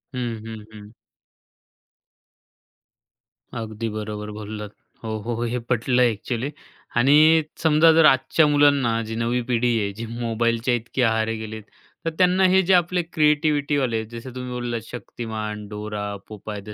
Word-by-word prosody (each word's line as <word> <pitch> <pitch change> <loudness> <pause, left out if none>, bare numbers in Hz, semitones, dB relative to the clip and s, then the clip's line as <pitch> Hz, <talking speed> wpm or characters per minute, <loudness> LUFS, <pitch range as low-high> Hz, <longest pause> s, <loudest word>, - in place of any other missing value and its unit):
हं, 120 -3 -3
हं, 110 -1 -8
हं. 105 -1 -12 2.7
अगदी 110 0 -4
बरोबर 105 0 -5
बोललात. 105 0 -7 0.3
हो, 110 -1 -3
हो. 120 +1 -3
हे 120 +1 -1
पटलं 125 +1 +2
एक्चुअली 120 +3 -1 0.5
आणि 135 +5 +5 0.5
समजा 160 +1 +6
जर 165 0 +6
आजच्या 135 +3 +4
मुलांना, 140 -6 +3
जी 110 +1 -5
नवी 120 +2 0
पिढी 120 -1 +1
आहे 100 -1 -1
जी 115 +3 -6
मोबाईलच्या 115 +1 -1
इतकी 120 +3 -3
आहारी 110 -1 +1
गेली 110 0 -6
आहे. 110 - -9 0.4
तर - - +2
त्यांना 185 +1 +4
हे 190 +1 +5
जे 190 - +4
आपले 180 0 +3
क्रिएटिव्हिटीवाले 145 -4 +2
आहेत, 110 0 -4
जसं 120 +2 -8
तुम्ही 125 0 -5
बोललात 120 -2 -3
शक्तिमान, 110 -3 -6
डोरा, 105 -1 -5
पोपाय 105 -1 -7
द 105 +1 -9
115 Hz, 145 wpm, -23 LUFS, 110-130 Hz, 2.7 s, समजा